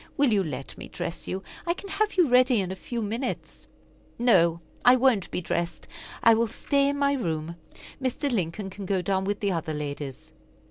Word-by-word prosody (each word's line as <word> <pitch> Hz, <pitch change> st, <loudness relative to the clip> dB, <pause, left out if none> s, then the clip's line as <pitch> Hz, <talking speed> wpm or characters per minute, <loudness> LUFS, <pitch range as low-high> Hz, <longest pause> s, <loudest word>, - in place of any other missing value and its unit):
Will 275 Hz, -5 st, +4 dB
you 200 Hz, -, +4 dB
let 150 Hz, -4 st, -6 dB
me -, -, -7 dB
dress 170 Hz, -, -5 dB
you? 190 Hz, +1 st, -3 dB, 0.2 s
I 340 Hz, -, +2 dB
can 395 Hz, -, -9 dB
have 425 Hz, +2 st, 0 dB
you 355 Hz, -4 st, +5 dB
ready 250 Hz, -1 st, +5 dB
in 185 Hz, -2 st, -2 dB
a -, -, -4 dB
few 235 Hz, +4 st, -4 dB
minutes." 230 Hz, +5 st, -4 dB, 0.5 s
"No, 170 Hz, -9 st, +4 dB, 0.2 s
I 245 Hz, +1 st, +8 dB
won't 250 Hz, -7 st, +3 dB
be -, -, -3 dB
dressed. 170 Hz, 0 st, -3 dB, 0.4 s
I 230 Hz, -, +8 dB
will 230 Hz, +1 st, +2 dB
stay 280 Hz, +5 st, +1 dB
in 285 Hz, -, -1 dB
my 280 Hz, 0 st, +2 dB
room. 165 Hz, -, -2 dB, 0.5 s
Mr. 265 Hz, +2 st, -1 dB
Lincoln 195 Hz, -1 st, -2 dB
can 195 Hz, 0 st, -7 dB
go 190 Hz, -2 st, 0 dB
down 190 Hz, +1 st, 0 dB
with 205 Hz, +1 st, -2 dB
the 200 Hz, -1 st, +1 dB
other 160 Hz, -3 st, -2 dB
ladies." 145 Hz, -3 st, -6 dB
205 Hz, 195 wpm, -26 LUFS, 170-255 Hz, 0.5 s, I